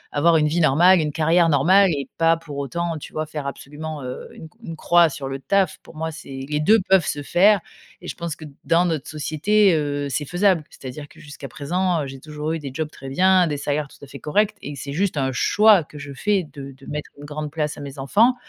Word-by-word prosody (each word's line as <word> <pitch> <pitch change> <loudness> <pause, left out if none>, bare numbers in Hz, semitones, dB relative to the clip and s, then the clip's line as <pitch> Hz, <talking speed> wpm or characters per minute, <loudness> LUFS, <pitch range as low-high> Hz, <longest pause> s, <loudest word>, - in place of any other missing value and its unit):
avoir 165 +3 +4
une 150 -1 +2
vie 165 +3 0
normale, 170 +5 +5
une 150 -1 -1
carrière 165 +2 +3
normale 185 +8 +5
et 140 -5 -2
pas 165 0 +4
pour 150 -4 -9
autant, 165 +3 -3
tu - - -11
vois, 155 0 -2
faire 150 -2 -6
absolument, 150 +1 -7
heu, 125 0 -7
une 160 - -10 0.2
une 165 -5 -6
croix 170 +1 +4
sur 140 -2 -6
le 135 0 -5
taf? 190 +5 0
Pour - - -16
moi, 160 +1 -3
c'est 135 -3 -8
les 150 0 -1
deux 215 +9 +5
peuvent 190 -4 +4
se 145 -1 -3
faire 195 +4 +4 0.4
et - - -10
je - - -5
pense 170 -3 -5
que, 155 - -11 0.2
dans 170 +2 +3
notre 160 -6 -2
société, 160 +7 +2
heu, 145 -2 -1
c'est 145 +2 -2
faisable. 180 +1 +2
C'est-à-dire 135 +3 -9
que - - -19
jusqu'à 145 -2 -10
présent, 170 +5 -1
heu, - - -5
j'ai 135 0 -9
toujours 150 +2 -5
eu 165 - -3
des 145 -2 -6
jobs 155 0 -3
très 135 - -10
bien, 185 +4 +4
des 150 - -2
salaires 145 0 -2
tout - - -18
à - - -17
fait 140 0 -10
corrects 205 +7 +1
et 145 - -7
c'est 140 +1 -6
juste 180 -1 -1
un 130 -1 0
choix 205 - +4
que 150 +1 -14
je 145 -1 -8
fais 195 +6 0
de 140 -1 -9
de 135 - -15
mettre 150 0 -5
une 145 - -10
grande 150 0 -5
place 150 -1 -2
à 145 - -8
mes 140 0 -8
enfants. 225 - +3
155 Hz, 245 wpm, -22 LUFS, 145-175 Hz, 0.4 s, normale